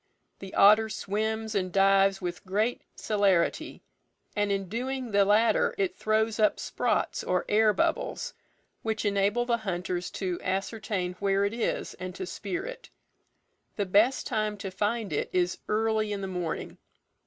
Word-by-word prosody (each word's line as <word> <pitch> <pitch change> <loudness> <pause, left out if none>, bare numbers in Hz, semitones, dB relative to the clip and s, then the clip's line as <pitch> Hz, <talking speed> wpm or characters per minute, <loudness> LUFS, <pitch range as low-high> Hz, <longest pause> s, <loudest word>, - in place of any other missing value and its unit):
The 195 -1 -9
otter 215 +2 +6
swims 220 +2 -2
and 185 -3 -1
dives 195 0 +4
with 175 0 -4
great 210 +5 0
celerity, 200 -5 +1 0.5
and 205 -1 +1
in 195 -1 -1
doing 250 +4 -3
the 200 -1 +4
latter 235 - +3
it 380 -2 0
throws 220 0 0
up 215 - +3
sprots, - - -1
or 180 0 0
air 215 +1 +4
bubbles, 325 +7 -1 0.5
which 220 -1 -2
enable 205 +4 +2
the 235 -1 +1
hunters 180 -4 -3
to 185 -3 -2
ascertain 195 -1 -2
where 200 0 +2
it 200 - -1
is, 230 -1 -2
and 185 -1 -6
to 190 - -4
spear 190 +1 -4
it. - - -8 0.9
The 205 - -1
best 210 +8 +3
time 215 -1 -1
to 195 -1 -6
find 205 -1 -1
it - - -1
is 180 -1 0
early 220 0 +1
in 200 -1 -3
the 195 - -3
morning. 180 -3 -4
205 Hz, 155 wpm, -28 LUFS, 195-220 Hz, 0.9 s, otter